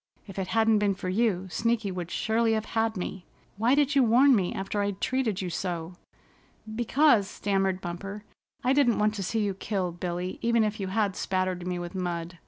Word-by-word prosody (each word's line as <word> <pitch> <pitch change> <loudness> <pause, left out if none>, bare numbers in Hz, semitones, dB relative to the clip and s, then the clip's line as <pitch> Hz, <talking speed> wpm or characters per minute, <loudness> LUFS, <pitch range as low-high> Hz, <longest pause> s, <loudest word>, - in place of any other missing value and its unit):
"If 195 -1 -8
it 190 - -2
hadn't 225 -1 +3
been 205 -2 +1
for 185 - -4
you, 190 -2 +1
Sneaky 230 -2 0
would 180 -2 -5
surely 225 +3 +1
have 220 0 -1
had 225 -1 +1
me. 180 0 -5 0.3
Why 235 +5 +3
did 290 0 +2
you 280 - +5
warn 250 +4 +6
me 185 -5 0
after 195 +2 -2
I'd 200 -1 -2
treated 235 -7 -1
you 180 - -3
so?" 170 0 -3 0.8
"Because," 240 -2 +3
stammered 195 -2 -1
Bumper, 195 +4 -6 0.4
"I 255 +1 +3
didn't 275 -5 +3
want 210 0 +2
to 200 -3 -4
see 220 +4 -1
you 205 -2 0
killed, 185 -3 -3
Billy, 180 +1 -3
even 235 -1 +3
if 215 +1 -2
you 195 - -2
had 200 0 0
spattered 185 -1 -1
me 180 -1 -2
with 175 +1 -6
mud. 175 -2 -4
200 Hz, 195 wpm, -27 LUFS, 185-225 Hz, 0.8 s, warn